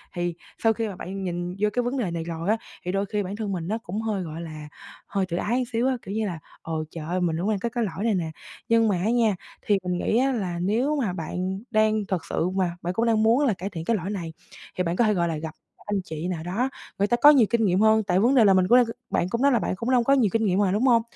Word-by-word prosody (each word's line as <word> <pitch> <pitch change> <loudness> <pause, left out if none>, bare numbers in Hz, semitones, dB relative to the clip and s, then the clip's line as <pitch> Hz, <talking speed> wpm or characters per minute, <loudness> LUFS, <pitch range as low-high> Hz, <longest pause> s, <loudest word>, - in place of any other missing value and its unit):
Thì 175 0 -1 0.3
sau 225 -1 +5
khi 225 0 -2
mà 200 - -6
bạn 190 +2 -6
nhìn 175 0 -3
vô 210 +1 +2
cái 245 - +1
vấn 245 +3 -2
đề 210 -9 -1
này 170 -1 -3
rồi 165 +2 -4
á, 220 - +3 0.3
thì 180 - -1
đôi 195 +1 0
khi 205 +1 -2
bản 190 +2 -5
thân 210 -2 -3
mình 170 -3 -3
nó 215 +4 -1
cũng 215 -2 -5
hơi, 215 -4 -2
gọi 160 0 -6
là, 155 -2 -8 0.4
hơi 195 -2 -1
tự 175 -2 -3
ái 240 +7 0
xíu 235 +3 +2
á, 260 -1 +1
kiểu 195 - -7
như 220 0 0
là 170 -4 -5 0.2
"Ờ, 165 - -6 0.2
trời 165 -2 -7
ơi, 180 +3 -1
mình 165 -2 0
cũng 190 +5 0
đang 210 -2 0
có 235 - -2
cái 240 0 -1
lỗi 200 -1 -3
này 225 -3 +2
nè." 165 -3 -2 0.4
Nhưng 230 -1 +4
mà 200 -4 +1
á 185 +5 0
nha, 230 -4 +3 0.3
thì 205 - +2
mình 180 -1 -1
nghĩ 215 - +1
á 270 +2 +3
là 185 -8 -2
nếu 235 +11 +1
mà 235 -11 -1
bạn 185 +3 -3
đang 215 -1 +2
thật 185 -4 -2
sự 170 - -1
mà 185 -2 -1
bạn 175 +1 -2
cũng 225 +5 +1
đang 220 -2 +3
muốn 235 +6 +4
là 240 - +3
cải 190 +1 -5
thiện 165 -4 -6
cái 230 - +2
lỗi 190 -2 -3
này, 175 -6 -4 0.4
thì 180 - +1
bạn 170 0 -1
có 235 - +3
thể, 215 - +3
gọi 175 -3 +1
là, 165 -2 -2
gặp 160 +2 -6 0.2
các - - -21
anh 195 - 0
chị 160 0 -5
nào 175 -3 -3
đó, 205 +10 -1 0.3
người 200 - +3
ta 240 - +2
có 295 - +10
nhiều 265 -7 +6
kinh 235 -2 +2
nghiệm 185 -1 +2
hơn, 220 0 +5
tại 185 -2 +1
vấn 240 +7 +3
đề 235 -4 +6
là 195 - +6
mình 185 -1 +4
q 245 +2 +6 0.2
bạn 175 - 0
cũng 235 +4 -2
nói 280 +1 +5
là 240 - +3
bạn 190 - -2
cũng 230 +6 -2
đâu 250 -2 +4
có 275 - +3
nhiều 250 -7 +3
kinh 225 -1 +2
nghiệm 190 -1 +2
mà, 200 -2 +2
đúng 210 +5 +1
hông? 235 -2 +5
200 Hz, 305 wpm, -25 LUFS, 180-225 Hz, 0.4 s, có